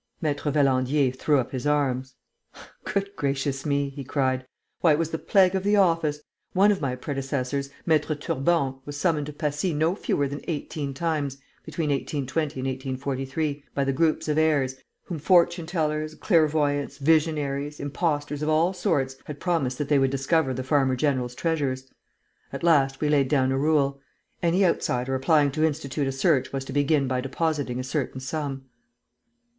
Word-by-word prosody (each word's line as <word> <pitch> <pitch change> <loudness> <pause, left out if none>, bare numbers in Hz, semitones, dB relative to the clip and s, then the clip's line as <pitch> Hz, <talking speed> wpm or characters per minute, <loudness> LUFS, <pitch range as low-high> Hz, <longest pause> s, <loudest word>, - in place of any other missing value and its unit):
Maître 145 -1 0
Valandier 135 -1 +2
threw 145 +2 +2
up 130 -2 -1
his 130 +2 -3
arms: 130 -3 0 0.7
"Goodness 200 -1 -2
gracious 140 -1 -2
me!" 140 -1 +1
he 140 0 -7
cried. 130 -1 -1 0.3
"Why, 165 -3 +5
it - - +2
was 165 0 -1
the 160 - -2
plague 190 -2 +4
of 190 - 0
the 205 +1 +3
office! 165 -6 +2 0.3
One 200 +2 +5
of 195 - -1
my 130 -3 -1
predecessors, 135 0 -3 0.2
Maître 155 -2 +2
Turbon, 135 -2 0
was 145 +1 -7
summoned 150 -2 0
to 150 - -6
Passy 150 +3 -1
no 160 +4 +2
fewer 145 -7 -1
than 140 +1 -6
eighteen 145 -3 -4
times, 150 -3 -1 0.3
between 155 -1 -2
1820 140 +1 -2
and 130 - -2
1843, 135 +2 -3
by 140 - +1
the 135 0 0
groups 155 +3 +1
of 150 0 +1
heirs, 140 -5 +2 0.3
whom 170 -4 -5
fortune 170 0 +3
tellers, 155 -2 -1
clairvoyants, 150 -5 +1
visionaries, 150 -1 +1
impostors 145 0 -2
of 155 - 0
all 165 +4 +3
sorts 135 -7 0
had 145 -1 -7
promised 155 -8 0
that 145 - -2
they 145 -1 +3
would 135 0 +3
discover 135 +2 +1
the 130 0 -3
farmer 130 -1 +2
general's 125 -3 0
treasures. 135 -5 -2 0.6
At - - -6
last, 140 -5 +3
we 150 - +1
laid 140 -3 +3
down 130 -2 +2
a 135 - +1
rule: 140 -2 +1 0.4
any 180 +3 +3
outsider 125 -6 0
applying 145 +2 +3
to 155 +3 -1
institute 145 -3 -1
a - - 0
search 135 +1 +1
was 135 -1 -3
to 135 - -7
begin 145 0 +2
by 130 0 0
depositing 140 -2 -1
a - - -2
certain 135 -1 -3
sum." 135 -1 -4
145 Hz, 170 wpm, -25 LUFS, 135-155 Hz, 0.7 s, Why